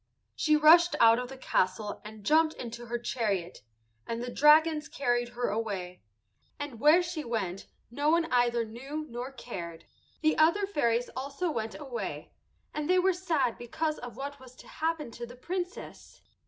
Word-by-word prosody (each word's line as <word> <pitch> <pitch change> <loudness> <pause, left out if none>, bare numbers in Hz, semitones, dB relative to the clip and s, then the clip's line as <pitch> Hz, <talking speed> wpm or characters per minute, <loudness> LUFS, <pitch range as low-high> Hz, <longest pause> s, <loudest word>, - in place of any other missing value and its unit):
She 305 -2 +3
rushed 335 +3 +6
out 230 +1 +6
of 250 0 -5
the 270 - -9
castle 205 -3 -1
and 215 0 -11
jumped 315 +3 +4
into 240 0 -7
her 240 +1 -2
chariot, 210 -7 -2 0.5
and 230 - -3
the 245 +1 -4
dragons 305 +1 +5
carried 240 -3 0
her 245 0 -2
away, 200 -4 -4 0.6
and 290 -6 -6
where 310 +6 +6
she 340 -3 -4
went 200 -7 -3 0.2
no 285 +4 0
one 335 +1 +3
either 240 -1 +2
knew 270 +8 -6
nor 245 +1 -6
cared. 175 -10 -8 0.4
The 310 -1 +2
other 335 +6 +4
fairies 245 - 0
also 280 +6 -3
went 225 -5 -4
away, 230 - -6 0.4
and 300 +1 -3
they 365 - +5
were 370 +1 +3
sad 320 -10 0
because 310 +6 -2
of 245 -2 -9
what 280 +1 -6
was 255 -1 -14
to - - -15
happen 320 -5 -2
to 240 +1 -7
the 245 - -11
Princess. 360 +7 -6
250 Hz, 165 wpm, -29 LUFS, 230-310 Hz, 0.6 s, rushed